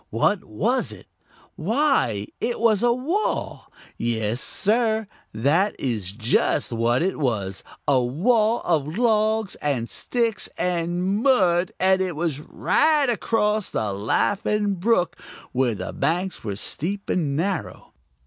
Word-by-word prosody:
What 180 - +1
was 230 - 0
it? - - -12 0.5
Why, 205 - +1
it 240 0 -2
was 220 -3 +3
a 240 0 +4
wall. 310 - -2 0.3
Yes, 115 0 -1
Sir, 220 +1 +1 0.3
that 150 - +1
is 110 -8 -2
just 115 +4 +1
what 120 +4 +1
it 190 -2 -1
was 100 -9 -1 0.2
a 135 -3 +4
wall 215 - +2
of 155 0 0
logs 220 -3 +2
and 135 -6 -1
sticks 230 - -1
and 180 +3 0
mud, 185 -9 +3
and 190 0 +3
it 185 -3 -2
was 155 -3 -2
right 295 - +2
across 215 -2 0
the 105 -3 -2
Laughing 205 - 0
Brook, 185 0 0 0.3
where 125 -3 +1
the - - -5
banks 180 +3 -1
were 105 -3 -3
steep 190 - -3
and 150 -6 0
narrow. 180 +3 -3
180 Hz, 130 wpm, -23 LUFS, -, 0.5 s, a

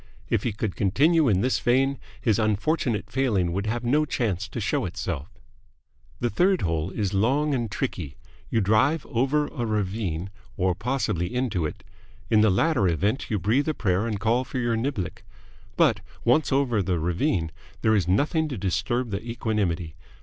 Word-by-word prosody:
If - - +2
he 120 - -1
could 105 -1 -3
continue 145 - +3
in 95 -3 +2
this 130 +3 +1
vein, 135 +3 +2 0.2
his 110 -3 +1
unfortunate 110 +1 0
failing 110 -10 +1
would 100 +3 -2
have 120 +2 -2
no 145 +6 +3
chance 105 - -1
to 120 - -6
show 105 - 0
itself. 85 -4 -4 0.9
The 120 - 0
third 185 +1 +2
hole 80 0 0
is 100 -1 -2
long 135 +9 +2
and 120 -4 -1
tricky. 90 - -4 0.3
You 115 - +1
drive 110 +10 +2
over 135 +5 +1
a 120 - -4
ravine 100 -4 -2 0.3
or 95 -1 +2
possibly 90 -5 -1
into 115 -11 0
it. - - -9 0.5
In 110 -1 +5
the 110 - +5
latter 120 - +2
event 100 - 0
you 105 - 0
breathe 115 - +1
a 155 - -1
prayer 100 +1 0
and 105 -3 -2
call 115 +4 +2
for 130 - -6
your 120 -2 +1
niblick. 115 - -3 0.5
But, - - +4 0.3
once 135 +7 +3
over 130 -6 +2
the 90 -2 0
ravine, 85 0 0 0.3
there 110 - +4
is 95 -5 +1
nothing 150 - +2
to 135 -5 -5
disturb 120 +6 -1
the 100 +1 -3
equanimity. 105 -8 -2
110 Hz, 170 wpm, -25 LUFS, 95-130 Hz, 0.9 s, In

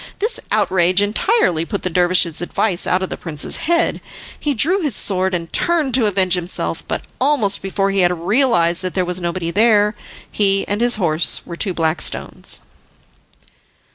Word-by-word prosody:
This 450 +4 -1
outrage 185 0 +2
entirely 205 - +1
put 200 +4 -5
the 185 - -1
dervish's 175 -2 +2
advice 175 +1 0
out 185 +1 +1
of 190 - -5
the - - -4
prince's 155 -4 +1
head. 340 0 +1 0.4
He 290 -2 -1
drew 360 - +3
his 290 -9 -1
sword, 190 -1 +1
and 165 -1 -6
turned 320 -7 +1
to 240 -3 +3
avenge 190 -3 +1
himself, 180 0 -2
but - - -4 0.2
almost 255 -8 +2
before 195 0 -1
he 195 - -1
had 175 -1 +3
realised 175 -4 +2
that 185 -1 -5
there 185 -1 0
was 180 +1 -3
nobody 170 0 -3
there, 210 0 +3 0.4
he 195 -1 +1
and 205 +2 -2
his 240 0 +3
horse 170 -6 +1
were 170 - -8
two 185 0 -2
black 160 0 -1
stones. - - -2
190 Hz, 170 wpm, -18 LUFS, 175-225 Hz, 0.4 s, drew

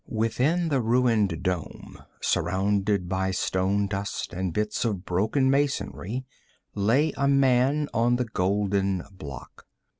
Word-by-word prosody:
Within 130 +10 +1
the 135 -4 +1
ruined 110 -7 +2
dome, 90 -4 -4 0.2
surrounded 100 0 0
by 95 +1 -1
stone 95 +2 0
dust 100 -2 -4
and 90 0 -2
bits 105 +4 -1
of 100 -6 -2
broken 110 +9 +1
masonry, 130 -4 -1 0.5
lay 125 +10 +2
a 140 - +1
man 135 +2 +3
on 120 +1 +2
the 125 0 0
golden 100 -2 0
block. 70 -8 -10
105 Hz, 120 wpm, -26 LUFS, 95-125 Hz, 0.5 s, man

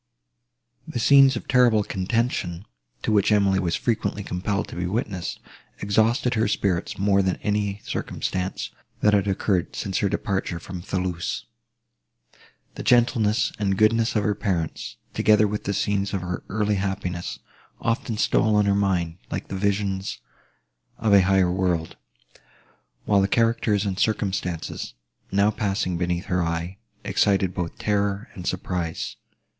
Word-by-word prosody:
The - - -5
scenes 135 +2 +6
of 120 - -6
terrible 120 -5 +4
contention, 95 -3 -1 0.4
to - - 0
which 105 0 +3
Emily 100 -2 +3
was 85 -3 0
frequently 110 -3 -1
compelled 100 +3 -2
to - - -8
be 90 0 -2
witness, 95 -3 -3 0.4
exhausted 115 +5 +2
her 110 -2 +2
spirits 95 -4 -1
more 100 0 +3
than 95 -1 +1
any 105 -1 -1
circumstances, 95 0 -3 0.3
that 105 - +4
had 100 -1 +3
occurred 95 -2 0
since 95 -2 -2
her 100 - +1
departure 95 -3 -2
from 90 +1 -7
Thoulouse. 90 -2 -3 1.3
The - - -7
gentleness 110 -3 +3
and 95 -2 +1
goodness 110 +2 +3
of 105 - +2
her 105 - +2
parents, 90 -6 -3 0.2
together 105 0 +4
with 105 +1 -4
the 100 - 0
scenes 100 0 0
of 95 - -2
her 90 0 -4
early 105 0 0
happiness, 95 -2 -3 0.4
often 115 -1 -1
stole 110 0 +3
on 105 0 +4
her 100 - +3
mind, 90 -4 0
like - - -4
the - - -4
visions 100 -1 -1 0.8
of 110 -2 +2
a 100 - +8
higher 95 -1 +3
world; 90 -3 -1 1.1
while 100 -2 +4
the 95 - +2
characters 115 -2 +2
and 95 -1 -2
circumstances, 95 - -2 0.4
now 100 +2 +3
passing 100 -3 -1
beneath 90 0 -1
her 90 0 0
eye, 85 +3 -3 0.2
excited 100 -1 +2
both 85 -2 -4
terror 100 +1 -1
and 90 -2 -7
surprise. 90 -2 -3
100 Hz, 145 wpm, -24 LUFS, 90-105 Hz, 1.3 s, a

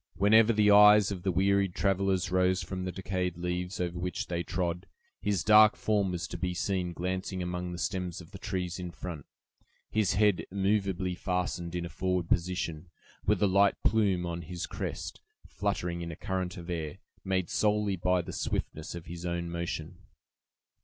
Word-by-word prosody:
Whenever 110 +3 +5
the 105 -2 +4
eyes 105 0 +8
of 95 -3 -4
the 95 +1 0
wearied 95 0 +2
travelers 95 -2 +1
rose 90 0 +2
from 95 +1 -4
the 90 - -2
decayed 90 -2 -3
leaves 90 +1 -3
over 90 -1 -2
which 90 0 -3
they 85 -1 -2
trod, 90 +1 -2 0.3
his 100 -5 0
dark 110 +3 +7
form 105 -4 +1
was 85 -2 -3
to - - -7
be 90 -1 -2
seen 90 -1 -1
glancing 95 +1 -3
among 90 0 -3
the 85 - -5
stems 90 -1 -3
of 85 -2 -13
the 95 - -9
trees 90 -3 -3
in 90 -1 -4
front, 85 -4 -7 0.6
his 110 -3 +2
head 105 -2 +3
immovably 95 -2 0
fastened 90 -1 -2
in 85 -1 -2
a - - -6
forward 90 -1 -1
position, 85 -2 -1 0.4
with 105 +1 +4
the 105 - +3
light 100 +1 +4
plume 100 -5 +2
on 85 0 -4
his 85 +1 -5
crest - - -5 0.2
fluttering 90 -3 -2
in 85 0 -4
a - - -7
current 95 +1 -3
of 90 0 -7
air, 80 0 -4 0.3
made 95 -2 0
solely 105 -2 +1
by 90 0 +1
the - - -7
swiftness 80 +2 -3
of 85 - -8
his 85 +1 -8
own 85 -1 -2
motion. 85 -2 -4
90 Hz, 180 wpm, -30 LUFS, 85-100 Hz, 0.6 s, eyes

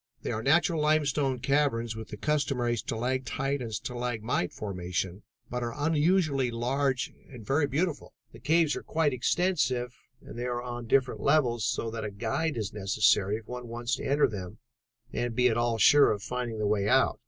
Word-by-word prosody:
They - - -2
are 110 - -2
natural 160 +5 +3
limestone 145 -3 +2
caverns 125 -5 +1
with 110 0 -7
the 105 - -8
customary 135 -4 0
stalactite 130 +4 -2
and 115 -2 -5
stalagmite 120 -4 -2
formation, 95 -1 -4 0.3
but 125 +1 -4
are 120 +1 -3
unusually 155 -3 +2
large 130 +3 -1 0.2
and 120 -5 -11
very 145 +5 +2
beautiful. 150 +3 -2 0.2
The - - -13
caves 160 -1 +2
are - - -5
quite 155 -3 0
extensive 130 -3 0 0.3
and 120 - -10
they 120 - -2
are 120 0 -2
on 120 -1 -6
different 130 +1 +2
levels, 125 -7 +2
so 115 -1 -2
that 110 -1 -5
a 105 - -3
guide 120 +9 -2
is 110 -1 -3
necessary 105 0 +2
if 110 - -13
one 125 -1 -6
wants 120 +1 -2
to - - -7
enter 145 +2 +3
them 100 -1 -7 0.6
and 120 -1 -2
be 125 +1 +4
at 115 - 0
all 120 -1 +1
sure 145 +6 +6
of 105 -1 -3
finding 125 -2 -3
the 105 - -1
way 100 -1 +1
out. 130 +1 +3
125 Hz, 180 wpm, -28 LUFS, 110-140 Hz, 0.6 s, sure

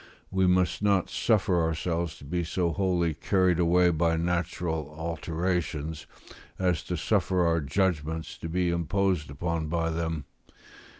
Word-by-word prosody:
We 95 -1 +2
must 90 0 +2
not 100 -2 +2
suffer 100 -6 +2
ourselves 80 0 -1
to - - -13
be 85 +4 -1
so 85 +1 0
wholly 90 -3 +1
carried 90 +2 +2
away 90 +1 +4
by 80 0 +2
natural 85 -2 -2
alterations 85 -1 -2 0.5
as 90 -4 +1
to 90 - -2
suffer 90 0 +1
our 85 -1 +2
judgments 80 +1 -1
to 80 - -5
be 90 +1 +1
imposed 85 -1 0
upon 80 +2 -2
by 80 +1 0
them. 80 -3 -2
85 Hz, 135 wpm, -28 LUFS, 80-90 Hz, 0.5 s, away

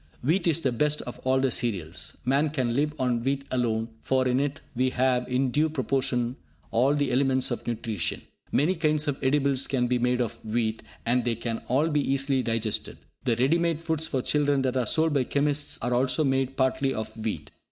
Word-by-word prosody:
Wheat 170 +8 +2
is 165 0 +2
the 130 - +1
best 150 +5 +1
of 125 - -8
all 130 0 +3
the 130 -1 +1
cereals. 95 -9 -2
Man 140 +4 +2
can 130 -5 -1
live 145 +4 +1
on 125 -3 0
wheat 135 +1 -1
alone, 115 -3 0
for 130 -1 +1
in 125 +1 +2
it 140 0 -1 0.2
we 130 +2 +2
have 125 -1 +1
in 130 0 +1
due 155 +4 +2
proportion 130 -3 -1 0.3
all 130 +5 +3
the 145 -2 0
elements 130 0 +2
of 120 - -4
nutrition. 115 -5 -2 0.3
Many 155 +7 +3
kinds 155 -3 +1
of 140 -2 -1
edibles 140 0 +2
can 130 -3 +1
be 125 0 +1
made 125 +1 +1
of 115 -1 -3
wheat, 110 0 -1 0.2
and 120 +1 +2
they 120 -1 0
can 115 0 -3
all 135 +6 +2
be 150 -2 +1
easily 135 -1 +1
digested. 115 -2 -2 0.3
The 120 -3 +2
ready 135 +8 +3
made 170 -2 0
foods 160 -1 -1
for 130 -5 -1
children 145 -2 +1
that 130 -1 0
are 125 -3 +1
sold 160 +4 +2
by 140 -3 +2
chemists 145 +2 0
are 120 +1 0
also 130 +5 +2
made 135 -1 0
partly 135 +1 +1
of 110 - -5
wheat. 105 -10 -4
130 Hz, 205 wpm, -27 LUFS, 120-145 Hz, 0.3 s, all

